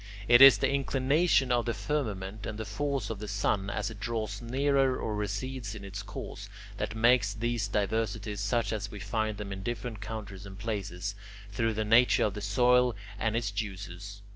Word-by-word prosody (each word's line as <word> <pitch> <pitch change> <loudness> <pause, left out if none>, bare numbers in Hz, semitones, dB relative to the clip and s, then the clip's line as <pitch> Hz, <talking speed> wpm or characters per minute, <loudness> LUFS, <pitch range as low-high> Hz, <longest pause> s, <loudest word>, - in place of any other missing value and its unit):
It 120 +1 +7
is 135 -1 +11
the 135 - +1
inclination 135 +1 +2
of 120 -1 +2
the 115 - 0
firmament 105 -8 -3
and 105 - -5
the 110 - -4
force 135 +2 -2
of 110 - -5
the 105 - -6
sun, 100 -1 0
as 105 - -2
it 105 - -10
draws 110 -2 -3
nearer 135 +2 +2
or 110 - -3
recedes 105 +3 -3
in 100 -2 -8
its 100 0 -6
course, - - -8 0.3
that 110 - -3
make 120 +1 +5
these 120 -2 -1
diversities 105 0 -1
such 115 +3 0
as 105 -1 -3
we 105 - -8
find 110 0 -2
them 100 -1 -5
in 95 - -6
different 120 -1 -4
countries 100 -3 -6
and 95 0 -10
places, 100 -2 -3 0.4
through 115 +1 0
the 110 0 -1
nature 115 +3 +5
of 105 - -1
the 105 - -6
soil 125 +4 +3 0.2
and 110 0 0
it's 115 -3 -1
juices. 100 -1 -6
110 Hz, 190 wpm, -29 LUFS, 100-120 Hz, 0.4 s, is